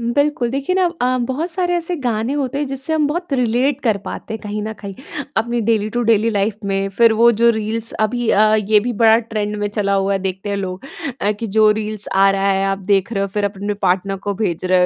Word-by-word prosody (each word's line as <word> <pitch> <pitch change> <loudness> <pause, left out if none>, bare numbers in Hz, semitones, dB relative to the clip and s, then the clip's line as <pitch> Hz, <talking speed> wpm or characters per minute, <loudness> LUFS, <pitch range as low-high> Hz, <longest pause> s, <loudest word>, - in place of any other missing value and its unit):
बिल्कुल 250 +1 0
देखिए 275 +8 -1
ना 375 - +3 0.2
अ, 255 0 +2
बहुत 305 +7 -2
सारे 355 0 0
ऐसे 345 +1 -2
गाने 240 -2 -1
होते 275 -1 -2
हैं 290 - -1
जिससे 270 +3 -3
हम 305 -2 +2
बहुत 340 0 -3
रिलेट 250 +2 +1
कर 220 -5 +2
पाते 220 - -6
हैं - - -6
कहीं 210 0 -4
न 220 +1 -4
कहीं। 200 -2 -8 0.4
अपनी 235 +2 0
डेली 215 -1 +1
टू 240 - +2
डेली 225 0 +3
लाइफ़ 205 0 0
में। 195 0 0
फिर 230 -1 +6
वो 235 +2 +5
जो 235 - +6
रील्स 220 +1 -3
अभी 240 +1 -1
अ, 215 +1 +4
ये 210 0 +3
भी 245 +3 -2
बड़ा 220 0 +7
ट्रेंड 215 -2 -3
में 205 0 -1
चला 200 -1 0
हुआ 195 0 +1
है 195 - +1
देखते 190 +1 -4
हैं 200 - -1
लोग 190 +2 -5 0.4
अ, 205 - +1
कि 225 +2 -5
जो 215 +1 +4
रील्स 215 -1 -3
आ 195 0 +5
रहा 195 0 0
है 195 0 +1
आप 195 0 -1
देख 200 +4 +1
रहे 195 -2 0
हो 200 - -1
फिर 205 - 0
अपने 205 +1 -2
पार्टनर 190 +1 +1
को 200 - 0
भेज 185 -4 -2
रहे 185 0 +3
220 Hz, 240 wpm, -19 LUFS, 200-245 Hz, 0.4 s, बड़ा